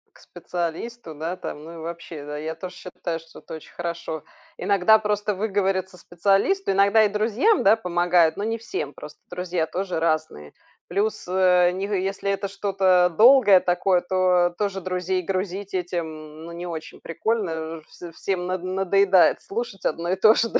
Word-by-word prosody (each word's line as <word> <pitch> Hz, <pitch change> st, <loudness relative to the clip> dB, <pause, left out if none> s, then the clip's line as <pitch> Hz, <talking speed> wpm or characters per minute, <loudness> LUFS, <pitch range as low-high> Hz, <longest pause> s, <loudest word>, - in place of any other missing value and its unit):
К -, -, -19 dB
специалисту, 175 Hz, +2 st, -6 dB
да, 165 Hz, +4 st, -4 dB
там, 150 Hz, -4 st, -7 dB
ну, 165 Hz, +2 st, -10 dB
и -, -, -10 dB
вообще, 165 Hz, -2 st, -7 dB
да, 150 Hz, 0 st, -6 dB
я 155 Hz, +2 st, -4 dB
тоже 180 Hz, +3 st, -8 dB
считаю, 170 Hz, -2 st, -5 dB
что 165 Hz, 0 st, -15 dB
это -, -, -9 dB
очень 160 Hz, -, -13 dB
хорошо. 170 Hz, -2 st, -5 dB, 0.3 s
Иногда 200 Hz, +2 st, +4 dB
просто 210 Hz, 0 st, -1 dB
выговориться 190 Hz, -2 st, -1 dB
специалисту 195 Hz, -, +1 dB
иногда 200 Hz, +3 st, +4 dB
и 210 Hz, -, +3 dB
друзьям, 225 Hz, -, +2 dB
да, 200 Hz, +3 st, +6 dB
помогает, 175 Hz, -4 st, +2 dB
но 200 Hz, -, -3 dB
не 225 Hz, +1 st, -2 dB
всем. 150 Hz, -10 st, -5 dB
Просто 150 Hz, 0 st, -11 dB
друзья 180 Hz, -2 st, -2 dB
тоже 185 Hz, 0 st, -3 dB
разные. 155 Hz, -, -2 dB, 0.3 s
Плюс, 210 Hz, +2 st, -1 dB
э, 180 Hz, -1 st, +4 dB
ни 190 Hz, +2 st, -3 dB
г 205 Hz, -1 st, -1 dB
если 195 Hz, +1 st, -2 dB
это 200 Hz, 0 st, -1 dB
что-то 190 Hz, -2 st, +2 dB
долгое 225 Hz, -5 st, +7 dB
такое, 180 Hz, +1 st, +1 dB
то 180 Hz, -1 st, +2 dB
тоже 200 Hz, -2 st, -1 dB
друзей 185 Hz, 0 st, -2 dB
грузить 195 Hz, +2 st, -3 dB
этим, 160 Hz, -4 st, -5 dB
ну, 170 Hz, -, -8 dB
не 175 Hz, +1 st, -6 dB
очень 160 Hz, -2 st, -7 dB
прикольно. 165 Hz, -4 st, -2 dB
Вж 170 Hz, +2 st, -12 dB
всем 180 Hz, +1 st, -3 dB
над 185 Hz, 0 st, -2 dB
надоедает 190 Hz, 0 st, +3 dB
слушать 205 Hz, -3 st, -5 dB
одно 170 Hz, +3 st, -1 dB
и -, -, +2 dB
то 215 Hz, +3 st, +6 dB
же, 230 Hz, -, +1 dB
да,, -, -, +2 dB
185 Hz, 170 wpm, -24 LUFS, 170-200 Hz, 0.3 s, долгое